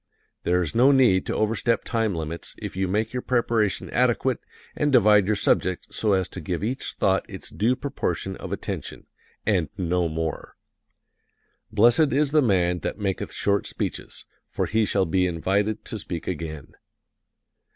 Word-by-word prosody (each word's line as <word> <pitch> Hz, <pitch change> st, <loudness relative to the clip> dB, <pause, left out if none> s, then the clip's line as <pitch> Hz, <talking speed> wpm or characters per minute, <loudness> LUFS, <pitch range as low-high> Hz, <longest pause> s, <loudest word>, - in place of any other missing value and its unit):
There 90 Hz, +1 st, +2 dB
is 80 Hz, -, -4 dB
no 125 Hz, +4 st, +5 dB
need 120 Hz, -9 st, +4 dB
to -, -, -1 dB
overstep 115 Hz, +2 st, +1 dB
time 115 Hz, -5 st, 0 dB
limits 80 Hz, 0 st, -5 dB
if -, -, -7 dB
you 95 Hz, 0 st, 0 dB
make 110 Hz, +5 st, -1 dB
your 125 Hz, -, -2 dB
preparation 115 Hz, -5 st, +1 dB
adequate 125 Hz, +1 st, +2 dB, 0.4 s
and 150 Hz, -1 st, +1 dB
divide 105 Hz, -5 st, +5 dB
your 105 Hz, -, +2 dB
subject 90 Hz, -2 st, 0 dB
so 105 Hz, -2 st, +1 dB
as 95 Hz, -1 st, +1 dB
to 95 Hz, -, -7 dB
give 85 Hz, +4 st, -3 dB
each 125 Hz, +5 st, -2 dB
thought -, -, +1 dB
its -, -, -7 dB
due 115 Hz, +5 st, +1 dB
proportion 110 Hz, -8 st, -3 dB
of -, -, -8 dB
attention -, -, -5 dB, 0.4 s
and 95 Hz, -7 st, +1 dB
no 90 Hz, -2 st, 0 dB
more. 80 Hz, -1 st, -4 dB, 1.2 s
Blessed 120 Hz, +8 st, +4 dB
is 145 Hz, +1 st, +2 dB
the 155 Hz, 0 st, +5 dB
man 90 Hz, -7 st, +2 dB
that -, -, -4 dB
maketh 100 Hz, -3 st, -2 dB
short 100 Hz, 0 st, 0 dB
speeches, -, -, -4 dB, 0.2 s
for -, -, -1 dB
he 110 Hz, 0 st, +1 dB
shall 95 Hz, -1 st, +1 dB
be 90 Hz, +2 st, +2 dB
invited 100 Hz, +5 st, -1 dB
to 110 Hz, -, -4 dB
speak 85 Hz, -4 st, -5 dB
again. 80 Hz, -4 st, -5 dB
100 Hz, 160 wpm, -25 LUFS, 90-115 Hz, 1.2 s, no